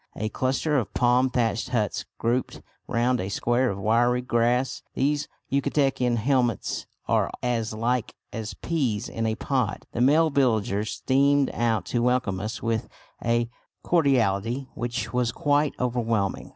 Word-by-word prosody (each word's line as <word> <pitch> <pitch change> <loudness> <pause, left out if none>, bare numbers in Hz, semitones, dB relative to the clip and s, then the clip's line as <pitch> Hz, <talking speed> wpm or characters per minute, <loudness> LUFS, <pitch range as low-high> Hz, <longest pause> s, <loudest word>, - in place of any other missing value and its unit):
A 110 +1 -2
cluster 135 +5 0
of 110 - -5
palm 125 +1 +3
thatched 115 -5 0
huts - - -1
grouped 120 +2 -1 0.2
round 120 +1 +1
a 95 - -3
square 120 +5 +1
of 95 - -3
wiry 120 +5 +2
grass 125 +2 +1
these 145 +2 +1 0.2
Yucatecan 135 -3 +1
hamlets 125 0 0 0.2
are - - +2
as 115 -3 0
like 115 +2 -1 0.2
as 110 -2 -5
peas 130 -11 -1
in 115 0 -2
a 110 - 0
pod. 125 -3 -1
The 115 - -2
male 155 +5 +4
villagers 110 -6 +1
streamed 140 +1 +2
out 115 -5 0
to 120 - +2
welcome 125 -6 +1
us 110 +3 -5
with 115 -1 -1 0.3
a 120 0 +1 0.4
cordiality 130 - +1
which 120 +2 -3
was 125 -2 +1
quite 145 +1 +1
overwhelming. 115 -5 -1
120 Hz, 140 wpm, -25 LUFS, 115-130 Hz, 0.4 s, male